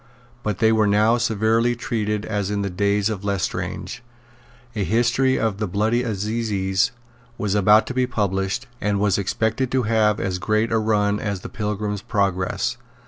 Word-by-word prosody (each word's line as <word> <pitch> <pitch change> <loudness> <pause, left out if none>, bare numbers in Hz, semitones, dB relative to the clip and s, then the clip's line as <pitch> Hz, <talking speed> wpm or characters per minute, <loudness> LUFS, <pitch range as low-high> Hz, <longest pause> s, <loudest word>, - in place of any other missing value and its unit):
But 105 -5 -2
they 110 +1 +4
were 110 -1 +3
now 105 +3 +3
as - - -3
severely 115 +2 +2
treated 105 -3 -2
as 105 -2 -2
in 100 -1 -1
the 100 - -3
days 100 +2 +1
of 105 -3 -4
Lestrange. 100 -3 -3 0.7
A 105 - 0
History 120 +5 +2
of 110 -3 -1
the 105 - -1
Bloody 110 +6 +1
Assizes 105 -1 0 0.5
was 105 -2 -1
about 105 +1 +5
to - - -5
be 125 0 +1
published, 95 +2 -1 0.2
and 105 -1 0
was 100 -1 +2
expected 110 +6 -1
to 130 -1 +2
have 105 -1 +2
as 90 -1 -2
great 110 +3 0
a 115 - +3
run 105 -1 +1
as 100 -3 -3
the - - -7
Pilgrim's 105 -1 -3
Progress. 100 -5 -1
105 Hz, 170 wpm, -22 LUFS, 100-115 Hz, 0.7 s, about